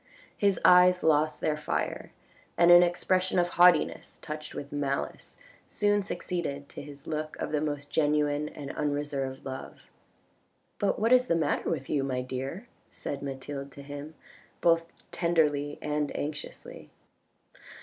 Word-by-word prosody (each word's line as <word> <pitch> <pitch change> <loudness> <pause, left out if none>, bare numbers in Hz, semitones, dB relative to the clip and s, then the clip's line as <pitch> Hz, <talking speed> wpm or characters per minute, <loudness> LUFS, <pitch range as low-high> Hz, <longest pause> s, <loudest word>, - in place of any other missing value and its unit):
His 200 -3 +2
eyes 180 0 +6
lost 155 -1 +2
their 155 - +1
fire, 150 - -3 0.5
and 170 0 +6
an 175 0 +10
expression 185 +1 +1
of 175 0 +3
haughtiness 175 0 +3
touched 155 0 -7
with 140 - -6
malice 140 -1 -3 0.3
soon 205 0 +1
succeeded 165 -7 -4
to - - -8
his 145 0 -12
look 155 -1 -4
of - - -4
the 150 -1 0
most 145 -1 -3
genuine 150 -1 +1
and 140 -2 -7
unreserved 145 -2 -2
love. 130 -1 -8 0.4
" - - -42
But 200 - +1
what 225 +4 +3
is 255 0 +5
the 170 - +2
matter 165 - 0
with 140 -5 -2
you, 140 -2 0
my 130 -2 -2
dear," 135 - -5 0.2
said 140 - -6
Mathilde 140 0 -6
to 140 - -10
him, 145 +2 -8 0.4
both 165 0 +2 0.2
tenderly 150 -4 +1
and 150 -1 -1
anxiously. 145 0 -7
150 Hz, 145 wpm, -28 LUFS, 145-175 Hz, 0.5 s, an